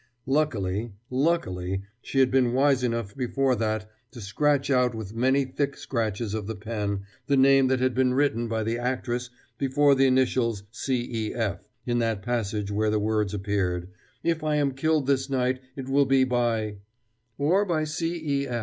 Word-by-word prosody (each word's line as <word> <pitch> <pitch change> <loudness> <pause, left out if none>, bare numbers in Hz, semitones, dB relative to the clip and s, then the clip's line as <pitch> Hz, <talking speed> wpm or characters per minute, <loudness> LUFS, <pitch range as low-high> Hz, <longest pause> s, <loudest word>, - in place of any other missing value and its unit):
Luckily, 115 -7 0 0.2
luckily, 95 - 0 0.2
she 135 - +1
had 130 -1 +3
been 130 -2 +3
wise 135 0 +3
enough 115 -4 -2
before 130 +1 +1
that 110 -1 -1 0.2
to 120 - -11
scratch 140 +8 +1
out 125 -2 +3
with 110 -2 -6
many 130 +4 +2
thick 140 +2 -2
scratches 110 -3 -2
of 110 -2 -3
the 110 - -4
pen 105 -2 -3 0.3
the 140 - +3
name 135 0 +5
that 130 0 +1
had 130 0 +1
been 130 0 +2
written 125 -4 +1
by 110 -1 -1
the 115 +2 -1
actress 125 -1 -2 0.3
before 140 +1 +4
the 135 0 +4
initials 125 -5 +1
C. 120 -3 -2
E. - - -6
F. 110 -5 -3 0.2
in 120 -1 0
that 115 -4 -1
passage 105 -3 -2
where 105 +1 +1
the 105 - +1
words 105 -1 0
appeared: 95 -3 -1 0.3
"If 165 -2 0
I 155 -1 +1
am 145 -2 +2
killed 150 +2 +1
this 135 0 +1
night 130 -1 0 0.2
it 135 -2 -6
will 140 +1 +3
be 135 0 +4
by 115 -4 0 0.6
or 170 +8 +3
by 170 -6 0
C. 165 +2 -2
E. 140 -4 -1
125 Hz, 175 wpm, -26 LUFS, 110-135 Hz, 0.6 s, name